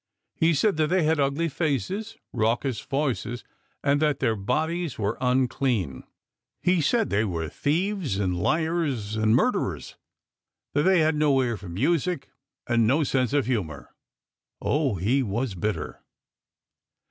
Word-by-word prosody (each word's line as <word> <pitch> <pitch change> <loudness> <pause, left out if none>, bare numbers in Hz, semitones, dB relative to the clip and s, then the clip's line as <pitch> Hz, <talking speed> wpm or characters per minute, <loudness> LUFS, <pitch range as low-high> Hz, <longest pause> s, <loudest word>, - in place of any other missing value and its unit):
He 165 0 +2
said 200 +3 +2
that 155 -1 +2
they 180 +1 +2
had 160 0 +2
ugly 140 +4 +1
faces, 165 - -2 0.2
raucous 120 +2 0
voices, 135 -4 -2 0.4
and 145 +1 +2
that 150 -2 +2
their 110 - +1
bodies 160 - -1
were 105 +1 -1
unclean. 125 - 0 0.6
He 180 -1 +3
said 225 +8 +1
they 105 +2 +2
were 85 -6 -2
thieves 165 - -1
and 95 -3 0
liars 150 - 0
and 110 +1 +3
murderers, - - 0 0.8
that 145 - +2
they 185 -3 +5
had 155 +1 +3
no 150 -3 +3
ear 120 -2 -1
for 100 -3 -9
music 165 - 0 0.3
and 115 -2 +2
no 145 +7 +3
sense 130 -3 +1
of 145 -2 +2
humour. 90 - -3 0.7
Oh, 140 -6 +1
he 110 +10 +1
was 115 0 -2
bitter 105 +4 -3
135 Hz, 140 wpm, -26 LUFS, 110-160 Hz, 0.8 s, they